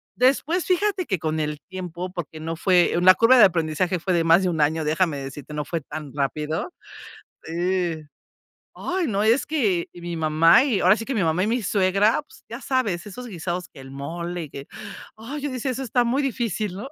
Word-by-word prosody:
Después, 280 +7 +2
fíjate 370 0 +1
que 190 -6 -1
con 155 0 -2
el 150 -1 -2
tiempo, 180 -1 -6
porque 160 -3 -7
no 165 +1 -4
fue 180 -1 +3
la 185 +1 +8
curva 245 +3 +5
de 215 - +9
aprendizaje, 170 +1 0
fue 185 +2 -1
de 170 -1 +2
más 165 +3 +6
de 185 - +1
un 160 -2 -2
año, 155 +2 +1
déjame 155 0 0
decirte, 140 +2 -8
no 150 -1 -3
fue 165 -2 -3
tan 145 0 -8
rápido. 150 - -2 0.7
Sí. 175 -1 -1 0.8
Ay, 360 -2 -2
no, 205 -3 0
es 230 +5 +3
que 210 - 0
mi 175 -1 -6
mamá 160 - +5
y 230 -9 0
ahora 185 +4 +5
sí 225 - -5
que 270 - -3
mi 200 - +1
mamá 165 +3 +1
y - - 0
mi 240 +2 0
suegra, 200 +5 +2
pues - - -20
ya - - -6
sabes, 215 -10 -1
esos 250 +5 -8
guisados, 180 -2 -4
que 145 - -15
el 135 0 -11
mole 170 +5 -5
y 150 - -9
que, 140 0 -9 0.5
ay, 260 +7 -6
yo 290 - -2
decía: 255 +1 -2
"Eso 265 +2 -4
está 245 0 +1
muy 250 +4 +1
difícil, 230 -7 -2
¿no?". 245 +8 -7
180 Hz, 210 wpm, -23 LUFS, 160-230 Hz, 0.8 s, de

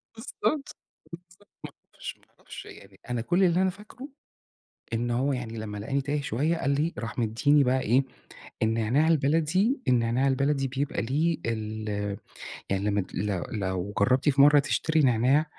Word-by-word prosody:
بالضبط، 225 - -9
بالضبط، 295 -3 0 1.0
ما - - -72
اعرفش، - - -7
ما - - -28
اعرفش، - - -10
يعني 95 -1 -14
أنا 120 -1 -1
كل 175 +11 +2
اللي 180 +1 +3
أنا 190 - +2
فاكره 215 +8 -11 0.9
إن 120 +1 -1
هو 135 +4 +1
يعني 115 -3 -5
لمّا 105 -1 -5
لقاني 135 +7 -2
تايه 145 +1 -2
شوية 145 +7 0
قال 140 - -1
لي 150 +4 0
راح 115 0 -5
مدّيني 140 +6 +3
بقى 130 +1 +1
إيه، 125 +5 +3 0.6
النعناع 115 +7 +2
البلدي، 165 - +2
النعناع 125 +2 +2
البلدي 135 0 +1
بيبقى 135 0 -2
ليه 155 +7 0
ال 110 -1 -3 0.8
يعني 95 0 0
لمّا 105 -1 +1
ت - - -11
لو 95 -2 -1
لو 95 -1 -3
جرّبتي 130 +7 +3
في 135 +1 +3
مرة 145 0 +7
تشتري 155 +2 0
نعناع 130 +3 +3
135 Hz, 160 wpm, -27 LUFS, 110-150 Hz, 1.0 s, مرة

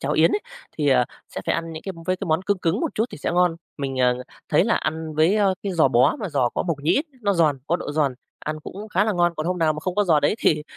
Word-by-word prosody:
cháo - - -1
yến - - +4
ấy, 410 - +1 0.4
thì, 150 -2 +2
à, 125 -2 +4 0.2
sẽ - - -6
phải - - +2
ăn 165 0 -3
những 160 - -7
cái 195 - -5
với 185 0 +1
cái - - -5
món 160 +2 +1
cưng 200 0 0
cứng 175 +7 0
một 325 - -2
chút 220 - +1
thì - - -9
sẽ - - -2
ngon. 175 -1 +3 0.2
Mình, 135 -2 -2
à, 125 -1 +4 0.4
thấy 155 - +4
là 230 - +2
ăn 160 0 -3
với, 160 +7 +3
a, 205 -2 +3 0.2
cái 200 -2 -2
giò 160 -5 +4
bó 125 - +4
mà 205 - -3
giò 140 -6 +1
có - - 0
mộc 165 -5 -2
nhĩ, 165 - +3 0.2
nó 200 - +2
giòn, 155 -5 +3
có 170 - +2
độ 145 - -5
giòn, 145 -4 +1 0.2
ăn 155 0 -5
cũng 205 +7 -8
khá 205 0 +2
là 215 - +1
ngon. 175 -1 +2
Còn 155 +2 -3
hôm 180 0 -1
nào 160 -2 +3
mà 155 - -6
không 180 +3 -3
có 205 - +2
giò 160 -5 +4
đấy 145 +8 +2
thì 150 -8 +2
165 Hz, 300 wpm, -23 LUFS, 150-185 Hz, 0.4 s, yến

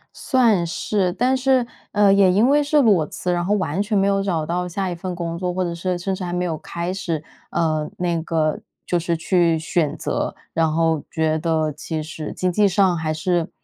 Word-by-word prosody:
算 230 -10 +2
是， 185 +2 -1
但 250 +7 +1
是， 260 -1 +2 0.3
呃 205 -1 +4
也 195 -2 +5
因 210 +6 +4
为 290 +2 +4
是 295 +1 +3
裸 195 - +4
辞， 180 +4 -3
然 175 0 0
后 205 +3 +1
完 185 -1 -1
全 210 0 0
没 195 - +3
有 195 0 +2
找 170 -6 -1
到 180 +2 -2
下 185 +1 -2
一 - - -3
份 180 +1 -5
工 170 -1 -4
作， 180 -1 -1
或 185 - -1
者 170 -1 -2
是 180 +1 -2
甚 190 +2 -2
至 185 - -4
还 175 - -3
没 180 0 -1
有 165 -3 -1
开 170 +4 -4
始。 170 -5 -3 0.3
呃， 155 -2 0
那 170 -2 -1
个 160 -2 0 0.3
就 175 - +1
是 170 0 -1
去 170 -1 +2
选 160 -1 -1
择， - - -2 0.2
然 160 -1 +2
后 160 -2 +1
觉 160 -1 0
得 160 -1 0
其 155 +1 -4
实 155 0 -6
经 185 0 -1
济 205 +3 +3
上 190 -1 +3
还 160 -1 -2
是 170 +2 0
175 Hz, 235 characters per minute, -21 LUFS, 160-195 Hz, 0.3 s, 也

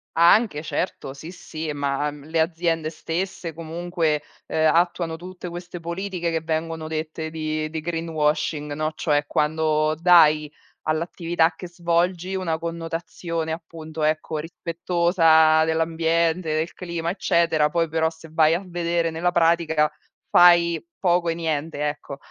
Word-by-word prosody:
Anche, 170 -1 +4
certo, 145 -5 -3
sì, 155 +5 -9
sì, 160 -3 -6
ma, 145 0 -1
mhmm, 145 -1 -12
le 160 +1 -1
aziende 165 -1 0
stesse 165 +1 -4
comunque, 165 -2 -2 0.2
ehm, 155 0 +2
attuano 170 -1 +1
tutte 180 +1 -9
queste 175 0 -7
politiche 170 0 -3
che 160 -1 -1
vengono 160 0 -3
dette 160 0 -4
di 155 -1 -3
di 160 0 -4
greenwashing, 155 -2 -1
no, 155 +1 -1
cioè, 145 -2 +1
quando 155 0 +1
dai 155 -3 +5 0.3
all'attività 165 +1 0
che 180 - -8
svolgi 175 +1 0
una 165 -4 -1
connotazione, 165 0 -4
appunto, 160 -1 -7
ecco, 155 0 0
rispettosa 165 -1 +3
dell'ambiente, 165 0 +1
del 160 +2 -1
clima, 170 -2 -3
eccetera, 170 -5 +2
poi 165 +1 +1
però 160 0 +1
se 160 0 -14
vai 160 0 +4
a 185 - -3
vedere 170 -1 -1
nella 170 +2 0
pratica 165 -3 +3 0.4
fai 170 -1 +6 0.2
poco 175 -2 +2
e - - +1
niente, 155 -2 -2
ecco. 145 -1 -5
165 Hz, 135 wpm, -23 LUFS, 155-170 Hz, 0.4 s, fai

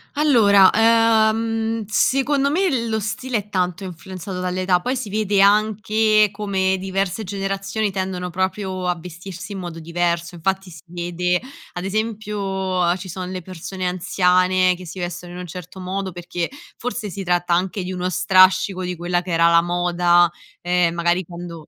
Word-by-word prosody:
Allora, 215 -10 +6
ehm, 225 0 +2
secondo 270 +6 +2
me 295 -8 +1
lo 220 -1 0
stile 230 +4 -2
è 210 0 -6
tanto 180 -1 -1
influenzato 185 +1 -7
dall'età, 180 0 0
poi 250 +7 -1
si 250 -4 -4
vede 210 -1 0
anche 215 +1 +3
come 195 -2 0
diverse 195 +2 -2
generazioni 195 +1 -2
tendono 185 -2 -3
proprio 185 0 -2
a 180 -1 0
vestirsi 180 +2 -9
in 195 - -5
modo 175 -2 -6
diverso. 170 +1 -1
Infatti 190 +2 -2
si 160 - -12
vede 175 +1 -1 0.3
ad 175 - -5
esempio 215 +1 -2
uhm 185 -2 0
ci 190 +1 -8
sono 185 +1 -6
le 185 -1 -5
persone 185 +1 -6
anziane 185 0 +2
che 180 +1 -11
si 180 +3 -8
vestono 175 0 -5
in - - -8
un 180 - -7
certo 180 +2 -9
modo, 190 +1 -3
perché 175 0 -4 0.3
forse 240 -3 -4
si 195 +1 -5
tratta 175 -1 +1
anche 185 +3 0
di 180 - -5
uno 180 0 -2
strascico 185 +1 +4
di 180 0 -3
quella 175 +1 -1
che 180 0 -7
era 170 0 +4
la 170 0 +5
moda, 175 0 +3 0.3
ehm, 175 -1 +2
magari 175 +2 +1
quando 170 -2 -9
185 Hz, 165 wpm, -21 LUFS, 175-205 Hz, 0.3 s, Allora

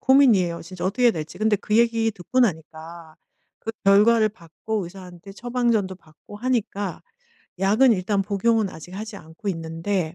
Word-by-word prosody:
고민이에요, 225 -11 +4
진짜 180 +1 -7
어떻게 240 +7 0
해야 240 - +7
될지. 160 +3 -7
근데 215 0 +2
그 210 +2 -1
얘기 230 -1 +3
듣고 220 +7 -2
나니까 160 -4 -3 0.5
그 225 - -4
결과를 215 +3 +5
받고 200 +2 -5
의사한테 180 +1 -11
처방전도 235 -4 0
받고 165 +4 -15
하니까 210 -5 -2 0.6
약은 215 +7 +4
일단 195 +1 0
복용은 210 +1 +1
아직 160 +3 -11
하지 215 +1 -6
않고 165 +5 -9
있는데 165 +1 -2
200 Hz, 350 characters per minute, -23 LUFS, 175-225 Hz, 0.6 s, 해야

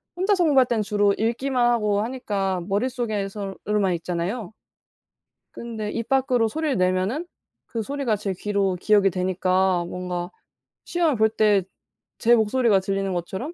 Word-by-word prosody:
혼자서 375 0 +2
공부할 265 -5 +4
때는 220 -3 0
주로 205 -1 +2
읽기만 240 +3 0
하고 210 -3 +1
하니까 200 -6 -2
머릿속에서 205 -3 -2
으로만 200 -4 +1
읽잖아요. 180 +5 -4 1.0
근데 220 -3 -5
입 230 +1 -4
밖으로 255 -4 +2
소리를 305 -3 -1
내면은 185 - 0 0.4
그 230 - -4
소리가 265 -3 -1
제 195 -2 -3
귀로 200 -2 0
기억이 200 0 +3
되니까 185 0 +1
뭔가 180 0 -4 0.6
시험을 335 -6 +1
볼 220 0 +4
때 210 -3 +3 0.6
제 240 +1 +6
목소리가 220 -2 +2
들리는 195 0 -2
것처럼 190 - -4
210 Hz, 325 characters per minute, -24 LUFS, 190-240 Hz, 1.0 s, 제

